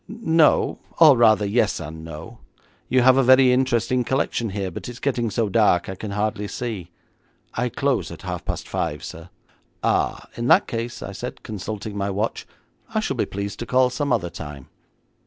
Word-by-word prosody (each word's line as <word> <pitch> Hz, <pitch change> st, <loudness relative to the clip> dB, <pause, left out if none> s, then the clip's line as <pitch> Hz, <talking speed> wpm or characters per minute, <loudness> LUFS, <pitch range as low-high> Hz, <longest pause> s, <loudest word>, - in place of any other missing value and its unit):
'No, 165 Hz, -9 st, +2 dB, 0.2 s
or 155 Hz, -4 st, +8 dB
rather 110 Hz, -3 st, +4 dB
yes 105 Hz, 0 st, +1 dB
and 80 Hz, 0 st, -8 dB
no. 80 Hz, +9 st, -9 dB, 0.5 s
You 130 Hz, -, +4 dB
have 130 Hz, +1 st, +6 dB
a 135 Hz, -, +4 dB
very 130 Hz, 0 st, +6 dB
interesting 125 Hz, -1 st, +1 dB
collection 120 Hz, -2 st, -1 dB
here, 95 Hz, -1 st, -3 dB
but 85 Hz, -, -7 dB
it's 120 Hz, -, -8 dB
getting 125 Hz, -4 st, -1 dB
so 115 Hz, +1 st, 0 dB
dark 100 Hz, -4 st, +3 dB
I 95 Hz, -, -4 dB
can 105 Hz, +3 st, -7 dB
hardly 105 Hz, 0 st, -2 dB
see.' 105 Hz, -7 st, -5 dB, 0.6 s
'I 125 Hz, +1 st, -1 dB
close 140 Hz, -1 st, 0 dB
at -, -, -10 dB
half -, -, -4 dB
past -, -, -4 dB
five, -, -, -3 dB
sir.' 80 Hz, +2 st, -9 dB, 0.5 s
'Ah, -, -, 0 dB
in 120 Hz, +1 st, -2 dB
that 165 Hz, +7 st, +6 dB
case,' 115 Hz, 0 st, -4 dB
I -, -, -6 dB
said, 120 Hz, +6 st, -7 dB
consulting 105 Hz, 0 st, -6 dB
my 100 Hz, 0 st, -1 dB
watch, 105 Hz, +3 st, -2 dB, 0.5 s
'I -, -, +3 dB
shall -, -, -2 dB
be -, -, 0 dB
pleased 100 Hz, 0 st, -5 dB
to 120 Hz, -, -5 dB
call 125 Hz, 0 st, +3 dB
some 140 Hz, +2 st, -2 dB
other 90 Hz, -8 st, 0 dB
time.' 75 Hz, -3 st, -9 dB
115 Hz, 185 wpm, -23 LUFS, 100-125 Hz, 0.6 s, or